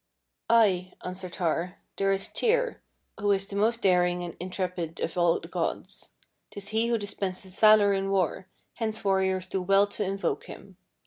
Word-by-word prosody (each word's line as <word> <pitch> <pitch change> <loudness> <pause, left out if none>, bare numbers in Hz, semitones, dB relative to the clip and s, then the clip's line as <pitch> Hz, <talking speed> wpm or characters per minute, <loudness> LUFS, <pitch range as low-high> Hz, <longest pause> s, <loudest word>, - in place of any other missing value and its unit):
"Ay," 190 -6 +3
answered 180 -1 -6
Har, 175 +2 -1 0.2
"there 195 0 +2
is 195 0 0
Tyr, 485 +1 0 0.4
who 205 +1 0
is 195 0 +1
the 200 - -8
most 225 +3 +1
daring 180 -1 +3
and 170 -2 -6
intrepid 180 -2 -4
of - - -3
all 175 -1 +3
the - - -10
gods. - - -4 0.4
'Tis 200 0 -7
he 225 +2 +1
who 235 0 +2
dispenses 190 -2 -5
valour 215 -2 +6
in 195 0 -1
war, 190 -1 0 0.3
hence 220 -2 -3
warriors 190 -2 +1
do 190 - -2
well 195 +2 +4
to 205 +1 -3
invoke 195 +1 -2
him. - - -12
195 Hz, 170 wpm, -27 LUFS, 180-205 Hz, 0.4 s, valour